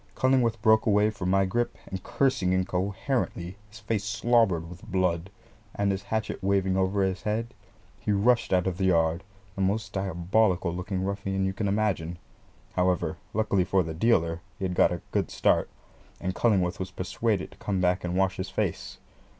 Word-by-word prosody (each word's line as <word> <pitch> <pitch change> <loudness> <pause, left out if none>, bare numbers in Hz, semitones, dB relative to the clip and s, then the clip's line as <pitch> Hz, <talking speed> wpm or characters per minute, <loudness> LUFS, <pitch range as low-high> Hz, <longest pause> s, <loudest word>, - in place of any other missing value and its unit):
Cullingworth 130 -3 +2
broke 110 0 +5
away 105 0 +4
from 90 -4 -3
my 95 +1 +3
grip, 120 +6 -1
and 95 -1 -6
cursing 100 -6 +1
incoherently, 95 +1 -1
his 105 - -13
face 105 -1 -2
slobbered 105 -5 +2
with 90 +2 -11
blood, 90 -1 0 0.5
and 100 -1 +1
his 95 0 -2
hatchet 110 0 -3
waving 95 -1 +1
over 95 +1 +1
his 95 0 -1
head, 110 +4 -2 0.5
he - - -1
rushed 115 +4 +3
out 90 -1 +3
of 95 -1 -2
the 95 - +1
yard 85 -1 +2 0.3
the 95 - -4
most 100 +4 0
diabolical 95 0 +1
looking 95 +1 -3
ruffian 95 0 -1
you 95 - -1
can 100 +1 -2
imagine. 100 -5 0 0.6
However, 90 -3 +1 0.2
luckily 105 -4 +2
for 95 0 +2
the 80 -1 -5
dealer, 85 -3 +2 0.2
he 95 - -3
had 90 - -1
got - - +4
a 90 - -4
good - - 0
start, - - +2 0.5
and 95 - -2
Cullingworth 95 -5 +1
was 95 0 -3
persuaded 95 +2 -2
to - - -17
come 100 -2 -1
back 90 0 +1
and 90 0 -2
wash 95 0 +1
his 95 +1 -4
face. 95 -2 -3
95 Hz, 175 wpm, -27 LUFS, 90-105 Hz, 0.6 s, broke